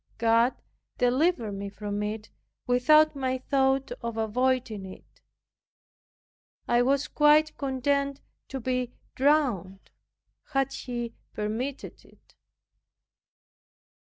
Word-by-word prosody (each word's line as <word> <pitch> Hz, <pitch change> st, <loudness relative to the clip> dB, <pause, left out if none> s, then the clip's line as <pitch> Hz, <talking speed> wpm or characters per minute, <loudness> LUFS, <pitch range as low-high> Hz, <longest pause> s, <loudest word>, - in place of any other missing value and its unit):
God 230 Hz, +2 st, +3 dB, 0.4 s
delivered 250 Hz, -, +2 dB
me 200 Hz, 0 st, -5 dB
from 205 Hz, 0 st, -4 dB
it 215 Hz, +1 st, -4 dB, 0.3 s
without 305 Hz, +5 st, +5 dB
my 260 Hz, -1 st, -1 dB
thought 270 Hz, 0 st, +1 dB
of 235 Hz, -1 st, -4 dB
avoiding 230 Hz, -1 st, 0 dB
it. 190 Hz, 0 st, -13 dB, 1.5 s
I 240 Hz, 0 st, +3 dB
was 275 Hz, +3 st, +2 dB
quite 300 Hz, +1 st, +4 dB
content 280 Hz, +1 st, 0 dB, 0.3 s
to 265 Hz, -, -5 dB
be 250 Hz, 0 st, -2 dB, 0.2 s
drowned, 250 Hz, -, +1 dB, 0.6 s
had 270 Hz, 0 st, +1 dB
He 240 Hz, -2 st, -5 dB, 0.2 s
permitted 225 Hz, +6 st, -4 dB
it. -, -, -24 dB
250 Hz, 95 wpm, -27 LUFS, 225-275 Hz, 1.5 s, without